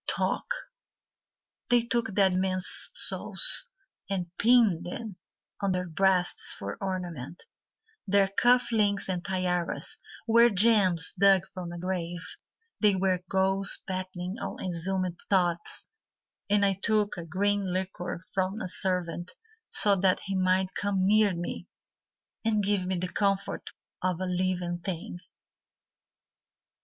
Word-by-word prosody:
Talk - - 0 1.2
They 245 -2 +4
took 235 -4 -1
dead 195 -2 +4
men's 185 0 +2
souls - - +4 0.4
And 180 -3 -4
pinned 220 -7 +4
them 195 +2 -7 0.4
on 195 -2 +1
their 180 0 -2
breasts 180 +1 +2
for 100 0 -5
ornament; 175 -6 -5 0.6
Their 200 0 +3
cuff 245 +5 +3
links 205 -3 +1
and 180 -2 -2
tiaras 180 -2 -2 0.3
Were 235 +1 +5
gems 195 -5 +3
dug 195 -2 +5
from 180 -2 -6
a 175 - -7
grave; 175 -1 -4 0.5
They 210 -2 +4
were 185 -1 0
ghouls 195 +1 0
battening 185 +1 -5
on - - -5
exhumed 180 0 -3
thoughts; 175 -3 0 0.6
And 205 0 +3
I 195 -1 0
took 210 -1 +2
a 175 - -6
green 195 +3 -1
liqueur 180 -2 -4
from 190 +2 -1
a 185 - -5
servant 180 -2 -3 0.4
So 205 -1 +5
that 185 0 +2
he 195 - -4
might 185 0 +1
come 195 -2 0
near 210 -1 +4
me 175 +1 -5 0.8
And 215 -2 +1
give 195 -2 0
me 185 -1 -1
the 180 +1 -2
comfort 195 +1 -1 0.3
of 180 -2 -1
a 185 - -2
living 180 -1 -2
thing. 175 -1 -6
185 Hz, 125 wpm, -28 LUFS, 180-200 Hz, 1.2 s, Were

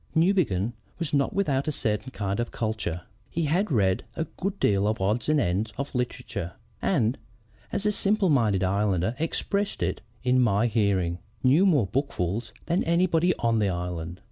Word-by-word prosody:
"Newbegin 160 - +2 0.2
was 165 -4 -3
not 140 -2 +2
without 145 -9 0
a - - +2
certain 110 -3 -1
kind 100 -5 -3
of 120 - -1
culture. 110 -7 -3 0.3
He 170 - -1
had 175 +7 +1
read 95 -6 +2
a 160 - -1
good 195 +5 -4
deal 100 0 +2
of 110 +1 +1
the 95 - -3
odds 110 +8 0
and 155 -1 +4
ends 100 0 0
of 140 +1 -4
literature 100 -7 -3 0.3
and, 130 - +1 0.5
as 205 - -2
a 210 - +4
simple 205 -1 +2
minded 110 - +3
islander 100 +2 +1
expressed 200 +5 -1
it - - -1 0.2
in 125 0 +3
my 110 -2 +3
hearing, 100 -6 +1 0.2
knew 150 +10 +5
more 145 - +4
bookfuls 110 - -2
than 170 +3 +1
anybody 170 +1 +3
on 115 -1 +1
the 105 -2 +2
island. 90 -1 -4
120 Hz, 170 wpm, -26 LUFS, 100-160 Hz, 0.5 s, knew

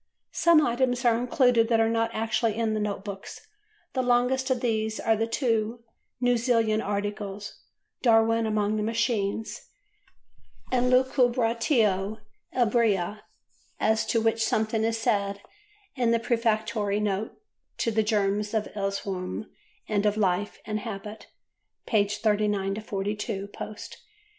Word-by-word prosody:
Some 330 -3 +5
items 245 +1 0
are 235 -1 +5
included 245 -1 +3
that 230 -1 +2
are 225 - +4
not 230 0 +1
actually 225 0 0
in 225 -1 0
the 215 - -1
Note 205 -1 -3
Books; 200 -1 -7 0.5
the 260 - +1
longest 250 +2 +2
of 255 -1 +1
these 220 -2 -1
are 225 - +2
the 225 +1 -1
two 230 -2 -1 0.4
New 245 0 +3
Zealand 225 -2 +2
articles 205 0 -4 0.4
"Darwin 225 -1 +4
among 215 0 0
the - - -1
Machines" 220 -1 -1 1.0
and 250 0 +2
"Lucubratio 235 -5 +2 0.3
Ebria" 215 -5 +1 0.6
as 220 0 +2
to 230 - +2
which 225 0 +1
something 220 0 0
is 225 0 0
said 200 -3 0 0.6
in 245 -3 +1
the 230 0 +3
Prefatory 220 -3 0
Note 210 0 -2 0.4
to 230 - 0
"The 220 0 +2
Germs 210 0 0
of 215 -1 -1
Erewhon 195 0 -3 0.4
and 210 -1 +1
of 210 0 0
Life 200 0 0
and 215 0 -2
Habit" 210 0 -7 0.6
(pp. 210 -2 +1
39–42 205 -1 -1
post). 215 0 -8
220 Hz, 130 wpm, -27 LUFS, 205-230 Hz, 1.0 s, Some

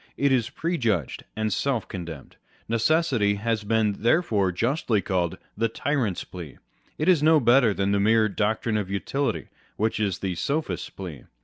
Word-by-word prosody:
It 140 0 +2
is 120 -3 +2
prejudged 120 - -1
and 110 -1 -1
self 135 -5 -1
condemned. 85 -7 -8 0.3
Necessity 115 -3 +2
has 110 +1 -1
been 105 -1 +1
therefore 110 - +2
justly 115 - 0
called 90 -2 -1
" - - -43
the 115 +2 0
tyrant's 125 -6 -1
plea." 85 -6 -9 0.4
It 155 - -1
is 180 -5 +5
no 155 +1 +5
better 125 0 +5
with - - -15
the 100 - +1
mere 110 +2 +4
doc 105 +1 -1
trine 110 -2 0
of 100 -3 -3
utility, 135 +8 -2 0.3
which 110 +1 0
is 100 -3 0
the 95 -2 -2
sophist's 140 - -2
plea. 90 -8 -8
110 Hz, 170 wpm, -25 LUFS, 100-135 Hz, 0.4 s, is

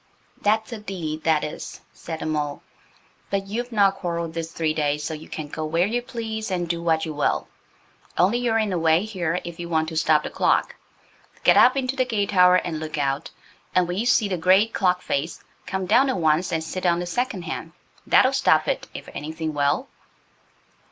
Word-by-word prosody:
"That's 220 +2 +1
a 230 - -5
deed, 165 -7 -5
that 160 -2 +3
is," 150 - -6
said 160 -1 -7
the - - -3
mole, 150 -2 -2 0.7
"but 195 0 -1
you've 240 +5 -4
not 200 -3 +3
quarrelled 170 -3 -3
this 165 0 -4
three 160 -2 -1
days, 150 -1 0
so 155 - -3
you 155 0 -9
can 155 -2 -5
go 155 +2 -5
where 165 +3 +1
you 235 +4 -1
please 225 -2 -5
and 175 -2 -1
do 170 0 -2
what 160 -1 +1
you 155 - -4
will. 145 - 0 0.7
Only 195 +8 +3
you're 235 -2 +1
in 215 -2 0
the 180 - 0
way 165 +4 +3
here 180 -5 -2
if 170 -1 -8
you 170 0 -5
want 160 -1 +1
to 160 - -7
stop 155 -1 +3
the - - -5
clock. - - +1 0.7
Get - - +6
up 255 +2 +6
into 260 0 -1
the 260 - +2
gate 210 -5 -1
tower 180 -2 +6
and 170 -3 -1
look 155 -1 -5
out, 140 -1 -1 0.5
and 180 -1 +4
when 175 - -3
you 235 - 0
see 230 -4 +4
the 185 -2 -2
great 190 +6 +4
clock 180 -2 +1
face, 145 +4 -2 0.2
come 190 -1 -2
down 240 +8 +4
at 260 - 0
once 160 +1 +2
and 160 -1 -1
sit 185 +3 -3
on 170 -1 +3
the 175 - -3
second 245 0 -2
hand. - - -6 0.3
That'll - - +5
stop - - +3
it, - - -1
if - - -8
anything 160 +1 -4
will." 145 -1 +1
175 Hz, 210 wpm, -24 LUFS, 160-205 Hz, 0.7 s, Get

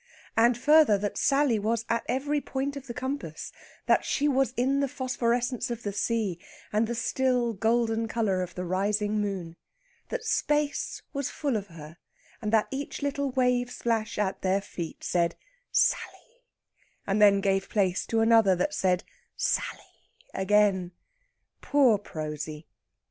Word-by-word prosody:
And, 235 +1 +4
further, 295 -4 +5
that 205 +1 -3
Sally 275 -5 +3
was 225 +2 -1
at 230 0 0
every 285 +4 0
point 275 +1 -3
of 275 -1 -8
the 235 - -5
compass 260 - -5 0.3
that - - +3
she 290 - 0
was 270 -3 +2
in 265 +3 +2
the 280 - +1
phosphorescence 245 -1 -1
of 235 -1 -5
the 205 - -3
sea, 205 -4 -1 0.3
and 215 +2 +2
the 235 - -3
still 245 0 +1
golden 225 +1 +1
colour 215 -5 0
of 180 -1 -5
the 180 - -4
rising 205 +3 0
moon. 185 -5 -4 0.5
That - - -3
space 295 -9 0
was 280 -2 -2
full 285 -5 -2
of 205 -2 -3
her, 165 -2 -12 0.4
and 210 -2 -2
that 220 -1 +3
each 280 +1 -5
little 280 0 -1
wave 250 -1 +1
splash 230 -2 -2
at 200 -2 -1
their 190 +1 +2
feet 170 -4 -7
said 170 -1 +1 0.4
"Sally," - - -1 0.6
and 200 +1 0
then 200 -1 +7
gave 195 -1 0
place 190 -3 +1
to 225 -1 +1
another 225 -4 +5
that 240 +12 -1
said 185 -9 +1 0.3
"Sally" - - -3 0.2
again. 190 -2 +2 0.7
Poor 260 -8 +4
Prosy! 155 -3 -6
225 Hz, 150 wpm, -27 LUFS, 195-260 Hz, 0.7 s, then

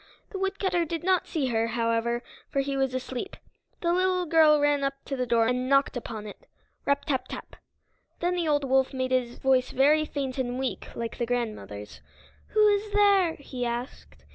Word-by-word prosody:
The 390 - -5
woodcutter 385 -2 0
did 330 0 -4
not 370 -1 +2
see 305 -5 -1
her, 225 -1 +1
however, 230 +1 0 0.3
for 275 - +1
he 275 0 -2
was 265 -1 0
asleep. 255 +7 -5 0.4
The 340 0 +2
little 365 0 +1
girl 310 -2 +5
ran 290 -1 +2
up 275 0 0
to 275 - -3
the 250 -1 -2
door 230 -1 +3
and 250 +2 0
knocked 275 -1 +3
upon 220 -3 -5
it, 205 - -11 0.4
rap 280 0 +1
tap 260 -4 -1
tap! - - -8 0.6
Then 350 +1 0
the 345 -2 -1
old 290 -1 +2
wolf 265 0 +2
made 260 0 -1
his 250 -2 0
voice 260 -1 +2
very 300 +4 +3
faint 270 -3 -4
and 250 -1 -2
weak 265 0 -3
like 230 +1 -5
the 235 - -1
grandmother's. 215 - -4 0.5
"Who 430 -1 +4
is 410 +1 0
there?" 400 -5 +4
he 260 -3 -6
asked. 240 +2 -5
270 Hz, 190 wpm, -27 LUFS, 245-330 Hz, 0.6 s, girl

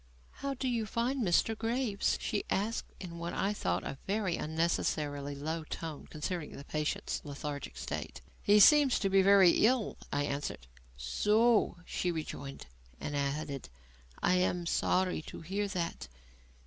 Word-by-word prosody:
"How 275 0 -2
do 260 +1 -2
you 230 -3 0
find 245 +5 0
Mr. 200 +4 +3
Graves?" 225 -2 0
she 210 - -1
asked 215 +4 -1
in 170 -3 -7
what 170 0 -4
I 200 +2 0
thought 90 - -1
a 135 - -5
very 195 -3 0
unnecessarily 150 -3 -1
low 160 +3 -3
tone, 160 -1 -6
considering 160 +1 -4
the 140 - -8
patient's 150 +1 -2
lethargic 145 -1 -6
state. - - -5 0.2
"He 205 +1 +5
seems 285 +4 +7
to 195 - 0
be 195 0 +6
very 195 -2 +7 0.2
ill," 250 -3 0
I 145 - +1
answered. 140 - -3 0.3
"So!" 210 - +3
she 180 - -1
rejoined, 145 -4 -6 0.3
and 145 - -4
added: 140 - -2 0.5
"I 180 - +4
am 180 -1 +1
sorry 185 +1 +1
to - - -8
hear 195 +5 -2
that. 170 - -3
175 Hz, 150 wpm, -32 LUFS, 150-210 Hz, 0.5 s, seems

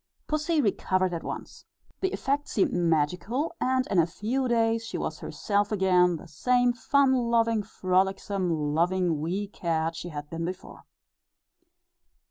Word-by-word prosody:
Pussy 305 +1 0
recovered 185 -4 +1
at 165 - -3
once; - - -7 0.4
the 380 0 0
effect 285 +2 -1
seemed 200 - +1
magical; 175 - 0
and 255 0 +2
in 190 - +3
a 165 - +4
few 235 +9 -2
days 230 -1 +2
she 225 - -5
was - - -4
herself 205 -1 -1
again, 180 -3 +3
the 165 - -9
same 245 - +2
fun 265 +3 +3
loving, 230 -3 +2
frolicsome, 185 -5 0
loving 175 0 +1
wee 185 +6 -2
cat 165 -4 -2
she 175 - -6
had 150 -2 -6
been 165 0 -4
before. 180 +2 -7
195 Hz, 140 wpm, -27 LUFS, 170-240 Hz, 0.4 s, a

